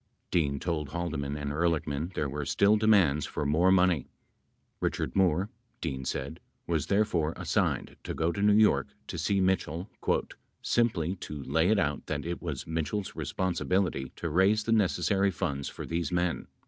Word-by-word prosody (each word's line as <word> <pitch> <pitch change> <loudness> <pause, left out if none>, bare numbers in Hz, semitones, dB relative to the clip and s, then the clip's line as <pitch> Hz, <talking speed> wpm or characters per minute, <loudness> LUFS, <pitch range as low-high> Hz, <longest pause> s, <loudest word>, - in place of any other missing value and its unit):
Dean 70 -5 +1
told 80 -5 -2
Haldeman 75 -4 -3
and 75 -1 -3
Ehrlichman 80 0 0
there 75 - 0
were 75 +2 -4
still 100 +8 +3
demands 100 -10 +3
for 75 - -3
more 80 +6 +4
money. 90 -6 +3 0.7
Richard - - -2
Moore, 95 +1 +2 0.3
Dean 65 -5 -4
said, 70 +4 -3 0.3
was 80 -4 -1
therefore 90 -6 +1
assigned - - 0
to - - -4
go 80 +2 +1
to 100 - -4
New 105 0 +5
York 105 -11 +4 0.2
to - - -5
see 100 -1 +1
Mitchell 95 -1 0 0.7
"simply 95 -7 +1
[to] 75 -4 -7
lay 80 +7 +2
it 110 - +4
out 75 -7 -1
that - - -3
it 85 +1 -4
was 75 -6 -4
Mitchell's 80 +5 -3
responsibility 90 -6 -1
to 85 - -4
raise 95 +6 +3
the 115 - -2
necessary 100 -1 +2
funds 70 -6 -2
for - - -7
these 85 -2 -2
men." 90 -1 0
85 Hz, 160 wpm, -29 LUFS, 75-95 Hz, 0.7 s, New